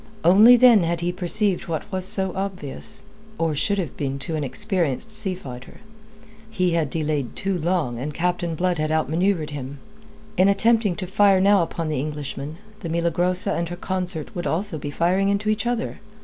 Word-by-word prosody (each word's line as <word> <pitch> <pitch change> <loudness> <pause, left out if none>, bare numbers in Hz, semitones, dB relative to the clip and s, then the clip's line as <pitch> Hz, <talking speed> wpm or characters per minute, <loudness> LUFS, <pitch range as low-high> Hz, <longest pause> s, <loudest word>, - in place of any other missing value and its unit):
Only 215 +8 +7
then 240 -4 +6
had 170 0 -1
he 175 +1 0
perceived 185 +2 0
what 160 -2 -3
was 185 -1 +2
so 190 -2 +2
obvious 190 -7 -4 0.3
or 165 -1 0
should 200 +8 0
have 170 -8 -3
been 135 -1 -3
to 165 - -3
an 150 - -2
experienced 190 - -2
sea 195 -3 +1
fighter: 130 -7 -11 0.7
he 185 -5 0
had 165 -4 0
delayed 150 -4 -2
too 195 0 -1
long 165 -8 -1
and 145 +4 -4
Captain 170 +1 -2
Blood 180 0 0
had 155 0 -1
outmanoeuvred 160 +1 0
him. 140 -1 -7 0.6
In 185 +2 +5
attempting 220 -1 +2
to 185 - -5
fire 195 0 +3
now 200 0 +4
upon 165 0 -3
the 155 -4 -2
Englishman, 150 +1 -5 0.2
the 170 - -6
Milagrosa 175 +3 +2
and 170 0 -2
her 175 - -5
consort 180 -3 -4
would 175 - -3
also 175 -1 0
be 145 - -5
firing 185 +6 +1
into 200 +1 0
each 215 +2 0
other. 240 -1 -2
175 Hz, 180 wpm, -23 LUFS, 155-195 Hz, 0.7 s, Only